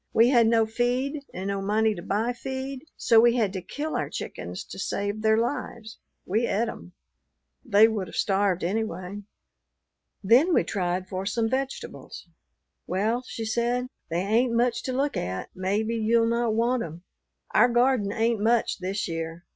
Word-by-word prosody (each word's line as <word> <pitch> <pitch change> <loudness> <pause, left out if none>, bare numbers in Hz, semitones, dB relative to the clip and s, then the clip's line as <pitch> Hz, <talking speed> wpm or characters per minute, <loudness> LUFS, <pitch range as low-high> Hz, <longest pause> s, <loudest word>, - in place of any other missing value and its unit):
We 230 +2 +5
had 240 -4 +5
no 225 -1 +4
feed 250 +6 -1
and 190 +2 -4
no 200 0 -2
money 215 +2 +2
to 175 - -7
buy 215 +6 -1
feed, 265 +2 -6
so 230 - +5
we 235 +1 +5
had 215 -5 +1
to 190 - -4
kill 305 - -4
our - - -1
chickens - - -6
to - - -10
save 205 +1 -2
their 220 0 +3
lives. 230 -2 -3 0.3
We 220 +5 +1
et 230 +4 0
'em. 180 -5 -8 0.7
They 220 -1 +6
would 210 -4 -2
have - - -10
starved 195 -3 +1
anyway." 200 0 -3 1.0
Then 260 - +5
we - - +4
tried 185 -2 -2
for 190 +1 -4
some 225 +2 0
vegetables. 265 +3 -5 0.6
"Well," 215 +7 0
she 225 - -5
said, 240 +3 0 0.2
"they 170 +2 0
ain't 230 +5 +2
much 235 0 +1
to 260 - -1
look 275 +3 0
at; 95 +1 -3
maybe 200 +5 -1
you'll 230 +1 +3
not 235 -1 +1
want 235 +2 +1
'em. 165 -1 -7 0.5
Our 245 - +5
garden 240 -4 +2
ain't 225 -1 0
much 230 0 +2
this 190 +3 -2
year. 165 0 -5
225 Hz, 170 wpm, -26 LUFS, 195-240 Hz, 1.0 s, They